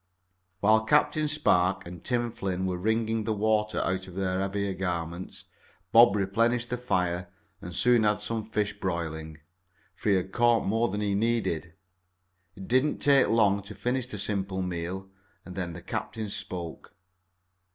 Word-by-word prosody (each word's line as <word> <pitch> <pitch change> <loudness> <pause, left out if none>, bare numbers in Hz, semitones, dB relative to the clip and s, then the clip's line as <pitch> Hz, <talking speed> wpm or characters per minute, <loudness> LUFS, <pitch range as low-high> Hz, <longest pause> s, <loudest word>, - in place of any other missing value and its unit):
While 110 +2 +4
Captain 150 +4 +3
Spark 100 -12 +2
and 85 0 -9
Tim 120 -1 0
Flynn 95 -4 -3
were 90 -1 -1
wringing 110 +2 0
the 110 - 0
water 105 0 +1
out 95 +1 -2
of 90 - -11
their 95 -1 -1
heavier 100 0 -1
garments 90 -1 -4 0.5
Bob 115 -3 +7
replenished 115 +5 +1
the 125 - 0
fire 90 -6 -1 0.3
and 85 -1 -7
soon 120 +5 +4
had 105 -1 +2
some 110 +1 -4
fish 105 -2 -1
broiling, 80 -4 -3 0.6
for - - -3
he 100 - +5
had 95 0 -1
caught 120 0 +3
more 115 +4 +1
than 105 +2 -3
he 100 -1 0
needed. 100 -7 0 0.8
It 95 - -9
did 130 +2 +4
not 150 - -1
take 140 -2 +5
long 100 -3 +3
to 100 +1 -10
finish 125 0 -1
the 110 - -6
simple 95 -2 -2
meal, 90 +2 -4 0.4
and 90 - -9
then 90 -3 -3
the 85 - -9
captain 110 -2 -4
spoke. 85 -4 -6
100 Hz, 160 wpm, -28 LUFS, 90-115 Hz, 0.8 s, Bob